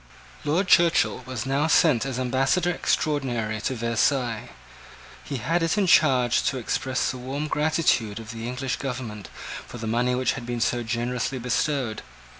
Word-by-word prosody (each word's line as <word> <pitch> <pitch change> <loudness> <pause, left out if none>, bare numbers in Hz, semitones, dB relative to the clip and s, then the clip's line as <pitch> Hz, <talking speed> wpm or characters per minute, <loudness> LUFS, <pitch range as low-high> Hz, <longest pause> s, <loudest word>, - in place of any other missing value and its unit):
Lord 165 +6 +1
Churchill 170 -6 +4
was 130 -4 -4
now 140 +3 +1
sent 155 -6 +4
as 130 -2 -3
ambassador 135 +8 +1
extraordinary 120 -10 -1
to 130 - -1
Versailles. 115 0 0 0.7
He 140 - -4
had 165 +9 0
it 165 +5 +1
in 205 - +3
charge 130 -8 +4
to 135 - -4
express 130 +2 -1
the 130 - -7
warm 135 +4 -4
gratitude 150 -9 +1
of 115 +1 -8
the 115 0 -6
English 125 +1 -3
government 120 - -5 0.4
for - - -9
the 115 - -6
money 120 +3 +1
which 125 -1 +1
had 125 - -6
been 120 -1 -2
so 120 +1 +1
generously 120 +3 -2
bestowed. 125 -1 -1
125 Hz, 160 wpm, -25 LUFS, 120-145 Hz, 0.7 s, Churchill